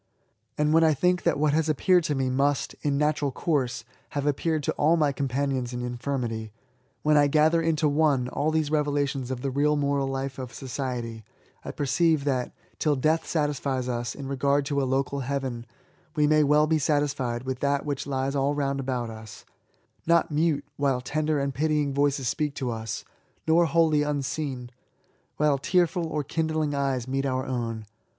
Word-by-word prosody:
And 150 +1 +2
when 165 +1 +5
I 160 -2 +4
think 180 +4 +2
that - - +1
what 150 0 +2
has 160 0 +1
appeared 175 +4 +3
to 150 - 0
me 135 -1 0
must, 135 +2 0
in 145 -1 0
natural 150 -1 +1
course, 130 -5 -1 0.3
have 140 - -1
appeared 150 +2 0
to - - 0
all 160 +3 +2
my 150 -3 +2
companions 135 -2 -2
in 125 0 -4
infirmity, 120 -3 -3 0.5
when 150 0 +4
I 145 -1 +5
gather 155 +3 +3
into 160 -1 +1
one 145 -4 +2
all 145 +4 0
these 155 -2 0
revelations 145 -4 0
of 130 -2 -4
the 135 - -2
real 145 +3 +2
moral 140 -1 0
life 135 0 -4
of 125 -2 -7
society, 120 -4 -4 0.4
I - - -7
perceive 150 +2 +1
that^ 130 -3 -1 0.3
till 150 -2 +2
death 155 +5 +1
satisfies 140 -4 -1
us 120 -2 -3
in 140 -1 -7
regard 140 +1 +1
to 140 0 0
a 130 - -1
local 135 +1 0
heaven, 130 -3 -3 0.5
we 150 -1 +3
may 155 0 +4
well 150 +1 +4
be 155 0 +1
satisfied 135 -5 0
with 130 -1 -4
that 140 0 0
which 140 -2 -3
lies 135 0 -1
all 140 +1 +1
round 140 -1 -1
about 125 -3 -2
us 110 -2 -11 0.3
— - - -41
not 170 -1 +3
mute, 150 -2 +1
while 140 -3 +1
tender 155 +3 -1
and 140 -1 -1
pitying 150 0 0
voices 140 -2 +1
speak 150 +2 -1
to 130 -3 -2
us; 110 -1 -5 0.4
nor 165 +2 +5
wholly 160 -2 +3
unseen, 140 -3 -3 0.7
while 145 -2 +2
tearM 175 +1 +1
or 150 -2 -2
kindling 155 0 -1
eyes 135 -3 -1
meet 135 +1 -1
our 130 0 -1
own. 115 -4 -3
140 Hz, 180 wpm, -26 LUFS, 130-150 Hz, 0.7 s, when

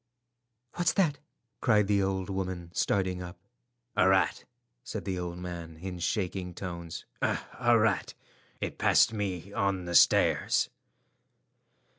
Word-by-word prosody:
"What's 175 -2 +1
that?" 165 -8 +2 0.4
cried 105 -4 +4
the 100 0 +2
old 95 -1 -1
woman, 95 -3 -4
starting 95 -2 0
up. 90 0 -8 0.6
"A 95 - +5
rat," 95 0 +2 0.4
said 110 -5 -6
the 95 -2 -2
old 90 0 -4
man 85 -2 -7
in 90 +1 -6
shaking 90 -1 -2
tones—"a 85 -3 -4 0.4
rat. 110 -3 +1 0.4
It - - -4
passed - - +5
me 100 -2 -3
on 100 -3 0
the 85 - -4
stairs." 85 - +4
95 Hz, 120 wpm, -29 LUFS, 90-100 Hz, 0.6 s, A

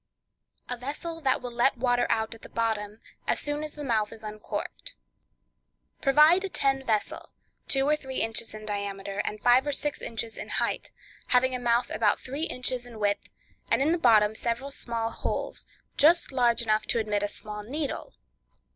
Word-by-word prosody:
A 250 - -2
Vessel 310 +6 -5
That 265 -3 +1
Will 245 - -4
Let 240 +2 +2
Water 245 0 +2
Out 220 +1 0
at 230 - -14
the - - -11
Bottom, 220 -2 -2 0.3
as - - +2
Soon 295 +1 -2
as 305 - -6
the 295 - -6
Mouth 220 -5 +1
is 225 -1 -9
Uncorked.—Provide 300 - -1
a 390 - -2
tin 270 -5 +1
vessel, 220 -4 -1 0.4
two 270 -1 +3
or 300 - +4
three 265 -3 -8
inches 225 -1 0
in 215 0 -8
diameter, 200 -1 -3
and 210 - -3
five 245 +5 +5
or - - +1
six 290 +1 -1
inches 225 0 -4
in - - -6
height, - - 0 0.4
having 255 +1 +3
a 250 - -1
mouth 240 0 +1
about 215 -2 +2
three 280 +5 -3
inches 250 -3 -2
in 235 -2 -11
width, 205 -1 0 0.4
and - - +3
in 285 +4 +3
the 345 - +1
bottom 215 -5 +5
several 235 +5 -2
small 230 -3 -3
holes, - - -3 0.3
just 335 +2 +5
large 240 -3 +3
enough 215 -1 +1
to - - +1
admit 210 -2 0
a 205 - 0
small 210 0 -7
needle. 280 +7 -4
240 Hz, 180 wpm, -28 LUFS, 220-275 Hz, 0.4 s, five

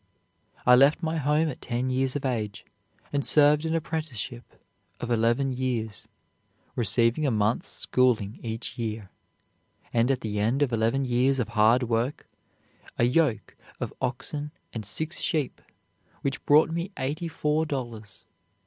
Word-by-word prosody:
I 125 - +7
left 140 +6 +5
my 160 0 0
home 150 +2 +2
at 130 - -7
ten 125 +2 -2
years 130 +1 0
of 145 - -3
age, 110 -5 -2 0.5
and 140 -1 +1
served 150 +2 +4
an 160 - 0
apprenticeship 150 - -4 0.4
of 120 - -4
eleven 120 +4 +2
years, 125 -4 -3 0.7
receiving 120 +4 +2
a 145 - +3
month's 110 0 0
schooling 115 -5 +1
each 115 +2 -5
year, 110 -4 -4 0.8
and, 115 +1 +3
at 135 -2 +1
the 105 -2 -3
end 120 +7 +2
of 130 -4 -1
eleven 115 +5 +1
years 130 +2 +2
of 120 -4 -1
hard 115 +3 +4
work, 120 +4 -1 0.7
a - - +2
yoke 125 -4 +1 0.2
of - - -4
oxen 145 +4 -3 0.2
and 110 -4 -5
six 160 +9 -1
sheep, 150 -6 -1 0.6
which 135 -1 -2
brought 155 +2 +6
me 170 +3 -2
eighty 150 +6 -2
four 155 0 0
dollars. 115 -8 -6
125 Hz, 145 wpm, -27 LUFS, 115-145 Hz, 0.8 s, I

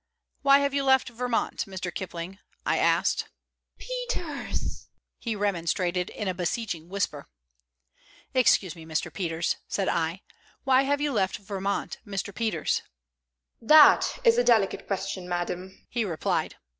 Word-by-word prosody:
"Why 275 0 +7
have 280 -1 0
you 280 0 +1
left 265 -1 +4
Vermont, 245 0 -1
Mr. 185 -2 -5
Kipling?" 185 +1 -6 0.3
I - - +2
asked. - - +2 0.5
"Peters!" - - -4 0.3
he 230 -3 -3
remonstrated, 180 -2 0
in 210 - -5
a 185 - 0
beseeching 175 -2 -3
whisper. 180 -7 -2 1.1
"Excuse 205 -8 +3
me, 165 - -11
Mr. 160 -1 -3
Peters," 170 -2 -1
said 195 - -1
I. 165 +3 -1 0.4
"Why 265 0 +4
have 285 +1 +1
you 295 -1 +1
left 195 -6 0
Vermont, 200 0 -3
Mr. 200 0 -4
Peters?" 215 -9 0 0.8
"That 305 +6 +7
is 470 0 +5
a - - +4
delicate 220 -5 +2
question, 190 -2 -3
madam," 180 +1 -4
he 240 -2 -1
replied. 170 -7 -1
195 Hz, 130 wpm, -27 LUFS, 180-255 Hz, 1.1 s, Why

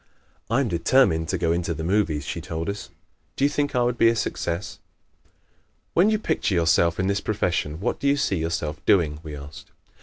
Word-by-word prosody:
"I 120 +5 +2
am 135 - 0
determined 85 -3 +2
to 95 - 0
go 85 -1 0
into 85 0 -1
the 80 - -5
movies," 85 -5 0
she - - -4
told 80 +2 -4
us. 100 0 -5 0.5
"Do 135 - +2
you - - +4
think 145 -1 -1
I 125 - +3
would 120 0 -1
be 115 - +6
a 115 - +1
success?" 85 -4 -3 1.1
"When 180 +5 +4
you 215 - +2
picture 160 - -1
yourself 85 0 +3
in 95 - +1
this 100 0 0
profession 85 -7 -1
what 100 - -2
do 140 - -1
you 140 +1 +3
see 100 -9 0
yourself 80 -1 -3
doing?" 75 -6 +3
we 75 -2 -8
asked. 70 +1 -11
90 Hz, 205 wpm, -24 LUFS, 80-115 Hz, 1.1 s, be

